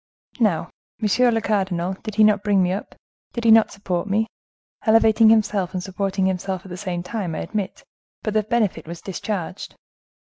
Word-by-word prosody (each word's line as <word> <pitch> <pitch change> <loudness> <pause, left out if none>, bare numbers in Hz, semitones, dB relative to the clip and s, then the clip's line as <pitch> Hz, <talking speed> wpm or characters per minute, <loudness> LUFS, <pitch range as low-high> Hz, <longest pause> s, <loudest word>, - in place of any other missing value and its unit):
Now, 205 -9 +1 0.3
monsieur 235 +3 +3
le 225 -1 +1
cardinal, 190 -4 0
did 215 -2 -6
he 215 - +5
not 210 -2 +4
bring 200 -3 +3
me 180 - +1
up, 195 - -5 0.4
did 235 - -4
he 230 - +5
not 225 0 +6
support 185 -2 -3
me?—elevating 220 +1 +2
himself 205 -4 +2
and 180 - -2
supporting 195 0 -1
himself 190 0 -2
at - - -10
the 180 - -6
same 180 -2 -4
time, 180 -4 -4
I - - -3
admit; 205 -3 -4 0.4
but 215 - -2
the 215 - +3
benefit 210 -7 -1
was 170 0 -7
discharged. 195 -1 -5
200 Hz, 175 wpm, -22 LUFS, 185-220 Hz, 0.4 s, not